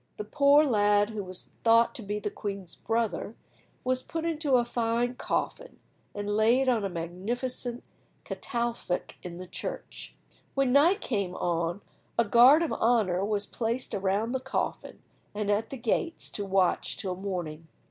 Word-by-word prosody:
The -, -, -3 dB
poor 285 Hz, +6 st, +5 dB
lad, 205 Hz, -5 st, +3 dB
who 210 Hz, -2 st, -4 dB
was 185 Hz, -1 st, -8 dB
thought 230 Hz, 0 st, +5 dB
to -, -, -7 dB
be 205 Hz, 0 st, -3 dB
the 210 Hz, 0 st, -3 dB
queen's 195 Hz, -4 st, -6 dB
brother, 225 Hz, -1 st, -2 dB, 0.5 s
was 255 Hz, 0 st, +1 dB
put 325 Hz, +4 st, -4 dB
in 330 Hz, -2 st, -1 dB
a 245 Hz, -2 st, +5 dB
fine 235 Hz, +1 st, 0 dB
coffin, -, -, -3 dB, 0.4 s
and 205 Hz, 0 st, -4 dB
laid 235 Hz, +5 st, +4 dB
on 235 Hz, -5 st, +2 dB
a 195 Hz, -, -1 dB
magnificent 235 Hz, +9 st, -4 dB, 0.4 s
catafalque 235 Hz, -7 st, -3 dB
in 175 Hz, -1 st, -7 dB
the 185 Hz, -, -7 dB
church. 180 Hz, -, -7 dB, 0.4 s
When 270 Hz, -2 st, +2 dB
night 335 Hz, +9 st, +5 dB
came 200 Hz, -6 st, -2 dB
on 170 Hz, +2 st, -1 dB, 0.4 s
a 235 Hz, -, +4 dB
guard 250 Hz, +9 st, +7 dB
of 330 Hz, -, -1 dB
honour 215 Hz, -6 st, +2 dB
was 205 Hz, 0 st, 0 dB
placed 235 Hz, +3 st, -3 dB
around 200 Hz, +3 st, 0 dB
the 260 Hz, -, 0 dB
coffin 265 Hz, +1 st, -4 dB, 0.3 s
and 205 Hz, -1 st, 0 dB
at 215 Hz, +2 st, 0 dB
the 270 Hz, -, -6 dB
gates 260 Hz, +8 st, -1 dB
to 205 Hz, -, -4 dB
watch 190 Hz, -2 st, +1 dB
till 185 Hz, -2 st, -3 dB
morning. 175 Hz, -5 st, -5 dB
220 Hz, 155 wpm, -28 LUFS, 195-250 Hz, 0.5 s, guard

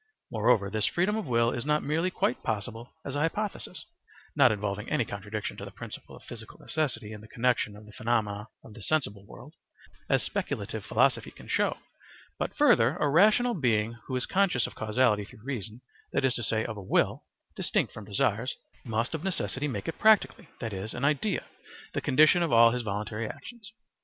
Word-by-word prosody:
Moreover, 110 Hz, -2 st, +3 dB
this 110 Hz, -1 st, +1 dB
freedom 185 Hz, +5 st, +1 dB
of 220 Hz, -6 st, -3 dB
will 115 Hz, -1 st, +3 dB
is 120 Hz, -, -3 dB
not 150 Hz, +1 st, +1 dB
merely 160 Hz, +5 st, +1 dB
quite 125 Hz, -, 0 dB
possible 115 Hz, +3 st, -3 dB, 0.2 s
as 140 Hz, -, -4 dB
a -, -, 0 dB
hypothesis 200 Hz, +7 st, -2 dB, 0.5 s
(not 135 Hz, -5 st, +6 dB
involving 105 Hz, 0 st, -3 dB
any 145 Hz, -6 st, +1 dB
contradiction 105 Hz, +1 st, -5 dB
to -, -, -7 dB
the -, -, -7 dB
principle -, -, -9 dB
of -, -, -15 dB
physical -, -, -10 dB
necessity 125 Hz, -9 st, -2 dB
in 105 Hz, -, -9 dB
the 110 Hz, -, -13 dB
connexion 115 Hz, -3 st, 0 dB
of 105 Hz, +1 st, -13 dB
the 105 Hz, -, -13 dB
phenomena 110 Hz, -3 st, -1 dB, 0.2 s
of 110 Hz, -, -13 dB
the 110 Hz, -, -11 dB
sensible 100 Hz, -7 st, 0 dB
world) 145 Hz, +7 st, -12 dB, 0.6 s
as -, -, +3 dB
speculative -, -, -3 dB
philosophy -, -, +2 dB
can -, -, -14 dB
show: -, -, +1 dB, 0.6 s
but -, -, -2 dB
further, 125 Hz, -, +5 dB
a 150 Hz, -, +2 dB
rational 215 Hz, -, +5 dB
being 115 Hz, -, +1 dB
who 130 Hz, -, -2 dB
is 125 Hz, -, +1 dB
conscious 185 Hz, -10 st, +2 dB
of -, -, -6 dB
causality 110 Hz, -1 st, +2 dB
through 105 Hz, +2 st, -14 dB
reason, 120 Hz, -3 st, -4 dB, 0.3 s
that -, -, +2 dB
is 130 Hz, -, +3 dB
to -, -, -2 dB
say, 110 Hz, 0 st, 0 dB
of 110 Hz, -2 st, -5 dB
a -, -, -6 dB
will 95 Hz, -, +1 dB, 0.3 s
(distinct -, -, 0 dB
from 110 Hz, -, -8 dB
desires), 105 Hz, +4 st, 0 dB, 0.3 s
must 115 Hz, +2 st, -1 dB
of 160 Hz, 0 st, -3 dB
necessity 155 Hz, -6 st, -1 dB
make 135 Hz, -, -4 dB
it 165 Hz, -, -4 dB
practically, 215 Hz, -, +4 dB
that 115 Hz, -3 st, -4 dB
is, 100 Hz, +3 st, -5 dB
in 125 Hz, -, -1 dB
idea, 155 Hz, +7 st, +1 dB, 0.5 s
the -, -, -1 dB
condition 155 Hz, +5 st, +5 dB
of 170 Hz, -, +1 dB
all 115 Hz, 0 st, +7 dB
his 125 Hz, +1 st, -1 dB
voluntary 105 Hz, +1 st, -3 dB
actions. 225 Hz, -5 st, -9 dB
120 Hz, 190 wpm, -29 LUFS, 105-150 Hz, 0.6 s, all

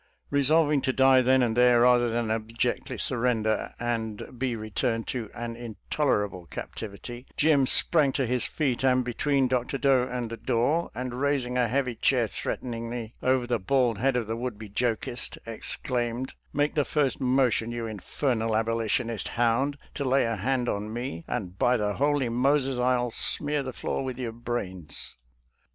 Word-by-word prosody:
Re 140 Hz, 0 st, +3 dB
solving 150 Hz, 0 st, +4 dB
to 130 Hz, -, +1 dB
die 130 Hz, 0 st, +6 dB
then 130 Hz, +1 st, +4 dB
and 115 Hz, -2 st, 0 dB
there, 125 Hz, -1 st, +5 dB
rather 120 Hz, -1 st, +5 dB
than 115 Hz, -1 st, -1 dB
ab 110 Hz, 0 st, -3 dB
jectly 120 Hz, +1 st, -1 dB
surrender 115 Hz, -3 st, 0 dB
and 115 Hz, 0 st, -3 dB
be 130 Hz, -2 st, 0 dB
returned 115 Hz, +1 st, -2 dB
to 115 Hz, -5 st, -3 dB
an 120 Hz, 0 st, -4 dB
intoler 120 Hz, +1 st, -1 dB
able 90 Hz, -4 st, -10 dB
captivity, 120 Hz, +4 st, -7 dB
Jim 145 Hz, -3 st, +4 dB
sprang 150 Hz, -1 st, +4 dB
to 135 Hz, -, 0 dB
his 125 Hz, +1 st, 0 dB
feet 135 Hz, -5 st, -1 dB
and 130 Hz, -1 st, +4 dB
be 120 Hz, -, -3 dB
tween 140 Hz, 0 st, +2 dB
Dr. 125 Hz, +2 st, -1 dB
Doe 135 Hz, -2 st, +3 dB
and 120 Hz, -2 st, -3 dB
the 115 Hz, -, -5 dB
door, 140 Hz, +11 st, +1 dB
and 125 Hz, 0 st, -4 dB
raising 135 Hz, -3 st, 0 dB
a 125 Hz, -1 st, +3 dB
heavy 130 Hz, +1 st, 0 dB
chair -, -, +2 dB
threateningly 115 Hz, -1 st, -4 dB
over 130 Hz, -1 st, +2 dB
the 120 Hz, -1 st, 0 dB
bald 120 Hz, +1 st, +1 dB
head 135 Hz, +2 st, +2 dB
of 120 Hz, -2 st, 0 dB
the 110 Hz, +1 st, -3 dB
would 120 Hz, -2 st, -4 dB
be 110 Hz, -1 st, -9 dB
jokist, 120 Hz, +2 st, -2 dB
exclaimed, 120 Hz, +2 st, -3 dB, 0.2 s
"Make 145 Hz, +1 st, +1 dB
the 150 Hz, -, +2 dB
first 140 Hz, -3 st, 0 dB
motion, 125 Hz, -3 st, +2 dB
you 120 Hz, -1 st, -3 dB
infernal 110 Hz, +2 st, -1 dB
Abo 115 Hz, +1 st, +1 dB
litionist 115 Hz, 0 st, -1 dB
hound, 120 Hz, +5 st, +1 dB, 0.2 s
to 145 Hz, -, -3 dB
lay 135 Hz, 0 st, +3 dB
a 115 Hz, -1 st, -1 dB
hand 125 Hz, +4 st, 0 dB
on 105 Hz, 0 st, -2 dB
me, 120 Hz, -8 st, -5 dB
and 95 Hz, -5 st, -4 dB
by 125 Hz, 0 st, +4 dB
the 105 Hz, -2 st, 0 dB
holy 145 Hz, +1 st, +1 dB
Moses, 135 Hz, +2 st, +1 dB
I'll 125 Hz, -1 st, +1 dB
smear 145 Hz, +5 st, 0 dB
the 130 Hz, -1 st, -4 dB
floor 130 Hz, -, -3 dB
with 130 Hz, -2 st, -4 dB
your 125 Hz, -3 st, -3 dB
brains 110 Hz, -8 st, -5 dB
125 Hz, 175 wpm, -27 LUFS, 115-130 Hz, 0.2 s, die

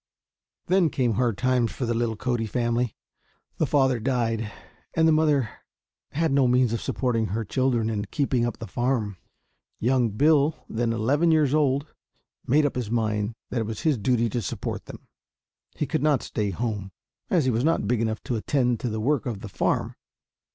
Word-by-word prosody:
Then 185 Hz, -2 st, +3 dB
came 125 Hz, -5 st, +1 dB
hard 115 Hz, -1 st, 0 dB
times 125 Hz, -1 st, +1 dB
for 130 Hz, -, -3 dB
the 120 Hz, -, 0 dB
little 115 Hz, -1 st, 0 dB
Cody 115 Hz, 0 st, -1 dB
family. 120 Hz, 0 st, 0 dB, 0.6 s
The -, -, +1 dB
father 135 Hz, -4 st, +3 dB
died, 115 Hz, -3 st, -1 dB, 0.4 s
and 160 Hz, 0 st, +4 dB
the -, -, +5 dB
mother 150 Hz, -6 st, +2 dB, 0.6 s
had 160 Hz, +1 st, +1 dB
no 135 Hz, -2 st, +4 dB
means 125 Hz, -1 st, +3 dB
of 115 Hz, -, -2 dB
supporting 115 Hz, -4 st, 0 dB
her 110 Hz, +3 st, -2 dB
children 125 Hz, -1 st, +1 dB
and 105 Hz, -2 st, -2 dB
keeping 135 Hz, -4 st, 0 dB
up 120 Hz, -, -2 dB
the 115 Hz, -, -6 dB
farm. 120 Hz, -5 st, -1 dB, 0.6 s
Young 125 Hz, 0 st, +2 dB
Bill, 150 Hz, +7 st, +2 dB
then 115 Hz, +1 st, -1 dB
eleven 135 Hz, +9 st, +2 dB
years 155 Hz, -4 st, +3 dB
old, 140 Hz, -2 st, +2 dB, 0.6 s
made 150 Hz, +4 st, +4 dB
up 145 Hz, -, 0 dB
his 125 Hz, -4 st, -3 dB
mind 110 Hz, -1 st, -1 dB, 0.2 s
that 125 Hz, -, 0 dB
it 110 Hz, -, -3 dB
was 110 Hz, -1 st, -5 dB
his 150 Hz, -7 st, +1 dB
duty 120 Hz, +2 st, +2 dB
to 120 Hz, +3 st, -2 dB
support 95 Hz, -, -4 dB
them. -, -, -11 dB, 0.7 s
He -, -, -1 dB
could -, -, -1 dB
not 145 Hz, -3 st, +2 dB
stay 105 Hz, -2 st, -2 dB
at 95 Hz, -, -3 dB
home, 105 Hz, -4 st, -3 dB, 0.4 s
as 165 Hz, -7 st, +2 dB
he 130 Hz, -, +3 dB
was 115 Hz, +2 st, 0 dB
not 160 Hz, -9 st, +1 dB
big 120 Hz, 0 st, +1 dB
enough 110 Hz, -2 st, -2 dB
to 125 Hz, -, -2 dB
attend 125 Hz, 0 st, +1 dB
to 125 Hz, -, -2 dB
the 110 Hz, 0 st, -3 dB
work 135 Hz, +3 st, 0 dB
of 110 Hz, -5 st, -4 dB
the 105 Hz, -, -7 dB
farm. -, -, 0 dB
120 Hz, 190 wpm, -25 LUFS, 110-135 Hz, 0.7 s, the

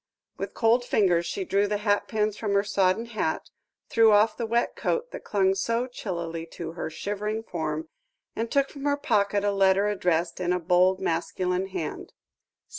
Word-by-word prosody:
With -, -, -6 dB
cold 235 Hz, +2 st, +3 dB
fingers 180 Hz, -7 st, +2 dB
she 390 Hz, -, -3 dB
drew 200 Hz, -, +2 dB
the 210 Hz, 0 st, 0 dB
hatpins 210 Hz, 0 st, 0 dB
from 210 Hz, -2 st, -2 dB
her 200 Hz, -, +3 dB
sodden 200 Hz, +1 st, +1 dB
hat, 210 Hz, -9 st, -3 dB, 0.4 s
threw 225 Hz, -1 st, +5 dB
off 210 Hz, +1 st, +4 dB
the 230 Hz, -, -3 dB
wet 235 Hz, +2 st, 0 dB
coat -, -, -1 dB
that -, -, -8 dB
clung 195 Hz, -2 st, +2 dB
so 230 Hz, +5 st, 0 dB
chillily 170 Hz, -9 st, -5 dB
to 165 Hz, -1 st, -5 dB
her 165 Hz, -1 st, -5 dB
shivering 210 Hz, +6 st, -3 dB
form, 160 Hz, -6 st, -3 dB, 0.5 s
and 230 Hz, +1 st, -2 dB
took 275 Hz, +1 st, +2 dB
from 280 Hz, -1 st, -8 dB
her 285 Hz, 0 st, +2 dB
pocket 205 Hz, -6 st, +1 dB
a 205 Hz, -, +2 dB
letter 195 Hz, 0 st, +3 dB
addressed 180 Hz, -5 st, 0 dB
in 180 Hz, 0 st, +1 dB
a 180 Hz, -, 0 dB
bold, 180 Hz, +2 st, +3 dB
masculine 180 Hz, +1 st, -1 dB
hand. 180 Hz, -5 st, -5 dB
200 Hz, 175 wpm, -26 LUFS, 180-225 Hz, 0.5 s, threw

